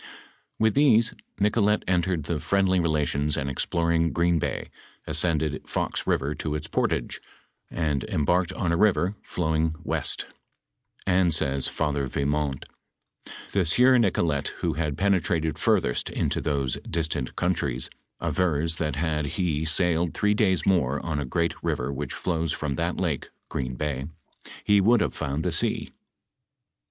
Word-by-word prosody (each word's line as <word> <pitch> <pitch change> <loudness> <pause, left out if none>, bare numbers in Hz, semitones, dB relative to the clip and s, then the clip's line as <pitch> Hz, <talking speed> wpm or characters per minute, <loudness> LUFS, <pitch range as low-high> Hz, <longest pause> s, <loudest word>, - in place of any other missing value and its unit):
With 110 -1 +3
theae 120 -6 +4 0.3
Nicolet 105 0 +2
entered 90 -4 0
into 85 -3 -1
friendly 95 0 +2
relationa, 75 -3 0
and 70 -2 -2
exploring 85 +4 +1
Green 85 -1 +2
hay, - - -3 0.4
aacended 75 -1 0
Fox - - -2
river 70 +2 +1
to 75 0 -3
ita 75 - -3
portage, - - -1 0.5
and 75 -4 -1
emharked 85 +4 +1
on 85 -4 0
a 85 - +2
river, 100 -1 +3
flowing 80 -1 -1
weat; - - 0 0.8
and 90 -1 +3
aays 70 -4 +1
Father 70 -3 -1
Yimont, 70 0 -1 0.5
" - - -35 0.3
the 100 - +1
aieur 125 +9 +5
Nicolet 85 -9 +1
who - - +1
had 75 -2 -2
pene 100 -2 +3
trated 80 -2 -1
furtheat - - +1
into - - -1
thoae 70 -4 -1
diatant 80 -5 -2
countriea, 70 -8 -1 0.3
avera 80 -3 0
that 75 -4 -1
had 75 -1 -1
he 80 -5 0
sailed 85 +1 +1
three 105 0 +2
daya 95 -6 +2
more 75 -8 +2
on 80 -3 -1
a 70 - -2
great 85 +6 0
river 60 +3 -1
which - - -4
flowa 80 -3 -1
from 75 -2 -2
that 85 +3 -2
lake 80 -8 -1 0.2
[Green 65 -1 -3
bay], 70 -1 -3 0.6
ho 105 -1 +5
would 115 +3 +4
have - - 0
found 70 +3 -3
the - - 0
aea." - - -1
80 Hz, 145 wpm, -26 LUFS, 75-90 Hz, 0.8 s, aieur